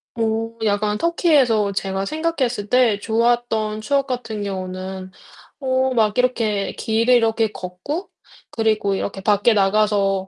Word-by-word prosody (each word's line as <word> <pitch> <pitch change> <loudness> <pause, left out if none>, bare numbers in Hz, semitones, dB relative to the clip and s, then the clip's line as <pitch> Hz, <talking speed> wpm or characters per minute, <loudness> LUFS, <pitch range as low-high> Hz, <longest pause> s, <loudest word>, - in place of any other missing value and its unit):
어 230 - -4 0.4
약간 210 0 0
터키에서 270 - +2
제가 195 0 -2
생각했을 270 -8 -2
때 235 -3 +3
좋았던 225 -1 0
추억 275 +5 0
같은 235 -5 -4
경우는 185 -1 -5 0.5
어 260 0 +1
막 220 -2 +1
이렇게 225 -5 0
길을 230 +2 +1
이렇게 225 -1 +2
걷고 185 - -6 0.4
그리고 215 -3 0
이렇게 195 0 -4
밖에 205 +3 +3
나가서 195 -1 +1
220 Hz, 275 characters per minute, -21 LUFS, 200-250 Hz, 0.5 s, 때